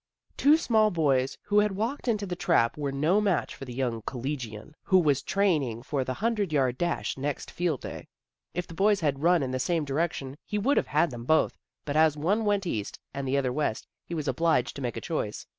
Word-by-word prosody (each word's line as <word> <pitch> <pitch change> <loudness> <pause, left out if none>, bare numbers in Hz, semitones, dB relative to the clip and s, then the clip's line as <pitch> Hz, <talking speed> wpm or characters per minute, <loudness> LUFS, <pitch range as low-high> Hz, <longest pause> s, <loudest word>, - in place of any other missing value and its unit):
The - - -8
two 295 +3 +7
small 220 -8 +3
boys 140 -7 +1
who 205 0 +3
had 210 -1 +2
walked 230 +8 -3
into 210 -4 +1
the 180 -2 -4
trap 165 -10 +2
were 145 -2 -2
no 155 +9 +2
match 195 -5 0
for 135 - -9
the 125 - -8
young 120 -4 -1
collegian, 125 -1 -5
who 185 - +3
was 145 -6 +3
training 145 - 0
for 135 0 -1
the 130 0 -3
hundred 210 -5 0
yard 130 -4 +1
dash 175 -5 -1
next 145 +1 -3
field 170 -6 -1
day. - - -7 0.5
If 180 0 -2
the 170 - -11
boys 200 +3 +3
had 140 -3 0
run 170 -1 +4
in 130 - -2
the 130 - -2
same 165 +3 0
direction 145 -1 -2
he 210 - -3
would 260 +8 +2
have - - +2
had 150 +4 +2
them 120 -1 -7
both, 155 +3 +3 0.3
but 145 - -3
as 155 -1 +4
one 200 +9 +1
went 205 -2 +1
east 110 - -3 0.2
and 140 0 -4
the 135 +2 +1
other 130 -3 0
west, 145 -6 -1 0.2
he 170 - -6
was 155 -2 -3
obliged 135 -1 +1
to - - -6
make 120 -4 -3
a - - -4
choice. - - -3
155 Hz, 225 wpm, -28 LUFS, 135-190 Hz, 0.5 s, two